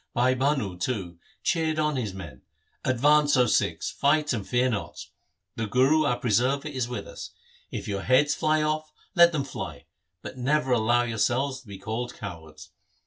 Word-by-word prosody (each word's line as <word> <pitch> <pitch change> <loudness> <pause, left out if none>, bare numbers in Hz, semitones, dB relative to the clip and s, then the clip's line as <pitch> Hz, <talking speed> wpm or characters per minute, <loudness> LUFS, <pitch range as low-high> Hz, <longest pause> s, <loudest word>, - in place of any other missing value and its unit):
Bhai 125 +2 +3
Bhanu, 130 -9 -1
too, 90 -7 -3 0.2
cheered 160 -2 0
on 150 -1 +1
his 115 -6 -2
men, 85 -9 -9 0.2
' - - -43
Advance, 145 +3 +4
O 125 - +5
Sikhs; - - 0
fight, 150 0 +2
and 105 -5 -4
fear 125 +1 +2
not. 110 -5 -4 0.5
The 115 - -2
Guru 135 +8 +3
our 125 -4 +1
preserver 125 +5 +1
is 130 -4 -3
with 125 - -5
us. - - -8 0.4
If - - -6
your 100 -1 -2
heads 135 +6 +3
fly 155 -1 +1
off, 155 0 -2 0.2
let 170 -2 +7
them 150 -4 -1
fly, 135 - -7 0.4
but 130 - -8
never 135 +1 +1
allow 120 +1 +3
yourselves 125 +4 0
to 125 - -22
be 100 -1 -8
called 115 +5 -4
cowards. 80 -3 -9
125 Hz, 175 wpm, -26 LUFS, 110-145 Hz, 0.5 s, let